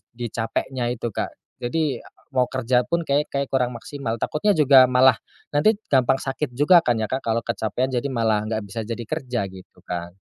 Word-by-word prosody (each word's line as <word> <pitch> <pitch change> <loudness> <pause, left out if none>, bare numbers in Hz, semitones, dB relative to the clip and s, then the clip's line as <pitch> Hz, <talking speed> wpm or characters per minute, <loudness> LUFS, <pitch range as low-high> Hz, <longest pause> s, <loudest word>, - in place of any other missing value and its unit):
di 120 0 -4
capeknya 120 +2 -2
itu, 120 -1 -4
Kak. - - -2 0.3
Jadi, 140 0 -1 0.3
mau 130 -2 +2
kerja 125 -1 0
pun 170 0 0
kayak 145 0 +1
kayaknya 140 -1 -1
kurang 125 -2 +1
maksimal. 120 -2 -5
Takutnya 205 +7 +1
juga 140 -5 +7
malah 125 -1 +5 0.3
nanti 150 +10 +3 0.2
gampang 130 -1 +3
sakit 135 -1 -3
juga 150 +7 +5
kan 120 - +3
ya, 110 - -2
Kak, 130 +1 -3
kalau 115 0 +1
kecapekan. 115 +3 -2
Jadi 125 +1 -2
malah 110 -3 +1
enggak 110 0 -2
bisa 105 +2 -6
jadi 115 +2 -4
kerja 120 -6 -2
gitu 95 -1 -15
kan. 85 0 -5
125 Hz, 185 wpm, -23 LUFS, 115-140 Hz, 0.3 s, juga